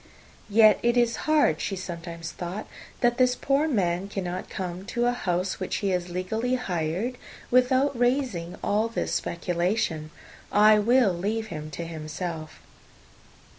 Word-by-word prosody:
"Yet 215 -1 +6
it 240 +1 +2
is 240 -1 +3
hard," 295 - +3
she 195 - -2
sometimes 170 -2 -6
thought, 180 +4 -5 0.4
"that 240 0 +2
this 250 -1 +4
poor 280 +4 +1
man 190 - 0
cannot 185 -2 -4
come 180 -1 -5
to 240 +3 -1
a 245 - +3
house, 185 -5 -1
which 185 - -2
he 200 - -1
has 180 -1 -1
legally 220 +8 -1
hired, 190 +2 -2 0.3
without 260 +2 +3
raising 245 -9 0
all 215 +2 +2
this 230 - -3
speculation! 170 -2 -1 0.4
I 210 +1 +6
will 235 -2 +4
leave 215 +5 -2
him 155 -1 -6
to 170 - -4
himself." 160 0 -6
195 Hz, 140 wpm, -26 LUFS, 175-240 Hz, 0.4 s, Yet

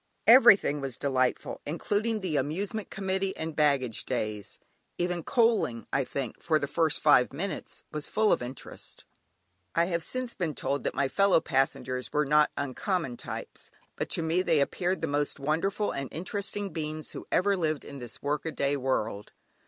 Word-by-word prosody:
Everything 220 - +7
was 135 -4 -4
delightful, 130 -2 0
including 210 +7 -1
the 180 -5 -2
"Amusement 195 +8 -2
Committee" 190 0 -2
and 160 -1 -4
"Baggage 140 -6 +2
Days"; 105 -5 -3 0.4
even 175 0 -1
coaling, 225 - +2
I 135 - +2
think, 130 -3 -5
for 160 -2 +2
the 145 - -1
first 160 +2 +2
five 145 -5 +5
minutes 180 +8 -5
was 150 -1 -3
full 215 -1 +2
of - - +2
interest. 125 +2 -8 0.7
I 170 - +4
have 170 -1 -1
since 255 +6 -3
been 165 -6 -2
told 140 +1 -2
that - - -1
my 140 - +2
fellow 195 +4 +4
passengers 130 -3 -1
were 150 0 +2
not 150 +2 +4
uncommon 145 - -2
types, - - -8 0.3
but - - -3
to 165 - -1
me 165 +3 +2
they 165 -4 +2
appeared 180 +6 0
the 165 - 0
most 145 0 -1
wonderful 165 +9 0
and 135 -1 -4
interesting 200 +4 -3
beings 155 -1 -4
who - - -8
ever 200 +2 +3
lived 155 -5 -1
in 140 -1 -8
this 120 -3 -7
work 145 0 -1
a - - -1
day 140 -1 0
world. 115 -6 -2
155 Hz, 170 wpm, -28 LUFS, 140-190 Hz, 0.7 s, Everything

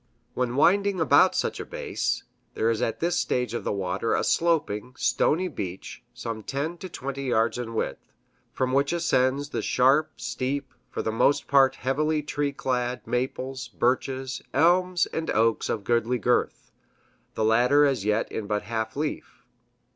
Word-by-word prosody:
When 125 -1 -1
winding 195 +6 +3
about 160 - +5
such - - -1
a - - -3
base, - - -3 0.3
there 115 +1 +2
is 115 0 -2
at 115 - -2
this 175 +1 +1
stage 125 -2 -1
of 120 - -3
the - - -1
water 100 +3 -1
a - - 0
sloping, 130 -9 0
stony 180 +4 +1
beach, 95 - -6
some 115 -1 -6
ten 145 +9 -3
to 185 - -7
twenty 140 -3 -5
yards 115 -1 +1
in 115 -2 -5
width, - - -4 0.4
from 130 -1 -1
which 140 +3 +2
ascends 140 -4 +1
the - - -2
sharp 135 +5 +2
steep, 130 +2 -3 0.2
for - - -4
the 110 - -1
most 125 +6 +2
part 135 -1 +4
heavily 150 +4 0
tree 145 -1 -1
clad 125 -2 -2
maples, 130 0 -3
birches, 130 +1 -1
elms 180 +4 +3
and 160 0 -2
oaks 115 0 +1
of 105 - -2
goodly 120 +3 +1
girth, 120 +1 0 0.6
the 110 - 0
latter 125 +6 +4
as 135 -8 0
yet 105 +2 0
in 105 - -4
but 105 0 -1
half 110 -1 -3
leaf. 150 +1 -4
130 Hz, 160 wpm, -26 LUFS, 115-145 Hz, 0.6 s, about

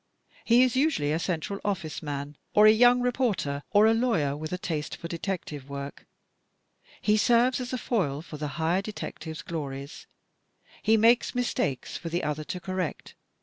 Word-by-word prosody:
He 235 +2 +5
is 255 -1 +1
usually 265 - +2
a 160 - +1
Central 185 +3 -2
OflSce 175 -7 -3
Man, 145 -1 -5 0.2
or 210 - +7
a 215 - +9
young 245 +3 +5
reporter, 225 - 0
or 210 +1 +5
a 220 - +5
lawyer 225 - +1
with 155 +1 -6
a 180 - -1
taste 160 -4 -4
for 170 - -6
detective 165 -5 -5
work. 140 0 -7 0.9
He 210 0 +2
serves 240 +4 +3
as 250 - -5
a 255 - -1
foil 160 - -1
for 155 - -9
the 150 0 -3
higher 170 +3 +1
detective's 175 -6 -7
glories. 140 -3 -6 0.7
He 220 0 +4
makes 235 +3 +4
mistakes 190 - -1
for 170 - -6
the 170 +2 -2
other 150 0 -2
to 180 - -4
correct. 185 -2 -4
180 Hz, 170 wpm, -27 LUFS, 150-225 Hz, 0.9 s, a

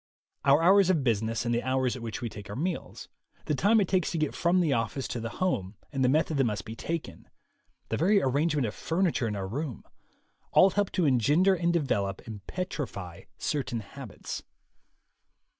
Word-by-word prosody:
Our 140 +3 +5
hours 190 +1 +6
of 165 -7 +2
business 115 -1 0
and 120 - +1
the 120 - +1
hours 130 -1 0
at 125 - -8
which 115 +1 -5
we - - -1
take 105 0 -10
our 100 - -5
meals, 170 +7 -4 0.4
the - - 0
time 205 - +4
it 195 - +2
takes 185 -2 +1
to 170 - -2
get 155 -2 0
from 175 +2 +2
the 160 -6 +2
office 115 +3 -1
to 120 - -3
the 115 0 -4
home 110 - -1 0.2
and 135 -1 0
the 125 - +4
method 155 +1 +2
that 135 - +4
must 105 -7 -2
be 110 - -7
taken, 165 +6 -5 0.6
the - - -1
very 200 +6 +4
arrange 145 +2 +1
ment 140 -4 +1
of 105 - -3
furniture 165 -7 0
in 105 - -2
our 95 -1 -3
room, 135 +4 -4 0.7
all 190 +1 +7
help 205 0 0
to 180 - +2
engender 145 - +4
and 170 -1 +1
develop 100 - -1
and 105 -3 -8
petrify 115 - -5
certain 125 -5 -2
habits. 125 +2 -8
135 Hz, 195 wpm, -28 LUFS, 115-170 Hz, 0.7 s, all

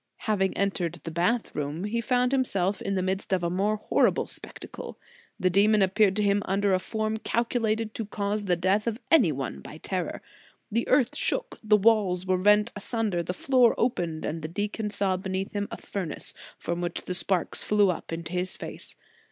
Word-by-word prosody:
Having 195 -3 0
entered 180 -4 -1
the 165 - -5
bath 215 +8 0
room, 150 +4 -3
he 225 +3 -1
found 250 0 +1
himself 200 -8 0
in 195 -1 -1
the 185 - 0
midst 190 +1 -2
of 185 -2 +1
a 170 - 0
more 200 +4 +1
horrible 210 - +2
spectacle. - - -7 0.4
The 185 0 +2
demon 205 +2 +4
appeared 195 +1 +3
to 210 - +1
him 200 0 +3
under 195 +1 +1
a 185 - +3
form 220 +2 -2
calcu 235 +2 0
lated 220 0 0
to 225 - -4
cause 205 0 -2
the 180 -2 +2
death 190 +5 +1
of 225 -1 0
any 260 - +6
one 130 - -4
by - - -10
terror. - - -4 0.5
The 230 +3 0
earth 255 -2 +3
shook, - - -2
the 215 -1 +5
walls 195 -4 +3
were 185 0 +2
rent 210 +2 +4
asunder, 205 -3 -1
the 170 - -3
floor 250 +2 +4
opened 175 -10 -1
and 160 +1 -3
the 155 - -4
deacon 210 +5 -3
saw 195 -2 0
beneath 190 +1 -3
him 205 0 -2
a - - -6
furnace, 185 -7 -3 0.2
from 170 +1 -3
which 175 -1 -3
the 180 - -2
sparks 180 -1 +1
flew 205 -4 +3
into 165 0 -5
his 180 +1 -1
face. - - -8
200 Hz, 195 wpm, -27 LUFS, 180-215 Hz, 0.5 s, any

